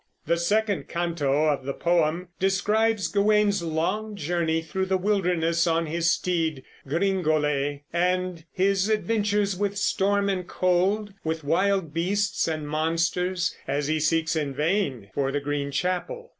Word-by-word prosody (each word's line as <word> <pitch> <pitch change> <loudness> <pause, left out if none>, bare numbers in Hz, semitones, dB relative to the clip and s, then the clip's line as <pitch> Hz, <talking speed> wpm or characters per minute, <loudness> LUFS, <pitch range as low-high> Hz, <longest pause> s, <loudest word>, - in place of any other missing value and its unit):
The 170 - +1
second 205 +3 0
canto 155 -4 0
of 140 -3 -1
the 140 +1 -4
poem 170 +1 +1
describes 205 +2 +1
Gawain's 205 +1 +2
long 170 +7 -2
journey 165 -1 -1
through 190 +4 -2
the 190 0 +2
wilderness 180 -4 +1
on 165 0 +1
his 165 +2 0
steed 160 -7 -1 0.2
Gringolet, 150 -4 0
and 180 -1 0
his 195 +1 +1
adventures 210 -2 +1
with 200 +1 -2
storm 200 0 +1
and 185 -3 -1
cold, 190 +3 +1
with, 160 0 -2
wild 180 +1 +1
beasts 200 +5 0
and 155 -2 -3
monsters, 165 +3 0
as 140 +1 -1
he 155 0 +1
seeks 165 +1 +1
in 145 -3 -2
vain 150 - -1
for 135 -1 0
the 145 - 0
Green 145 0 -2
Chapel. 185 - -2
175 Hz, 140 wpm, -25 LUFS, 155-200 Hz, 0.2 s, Gawain's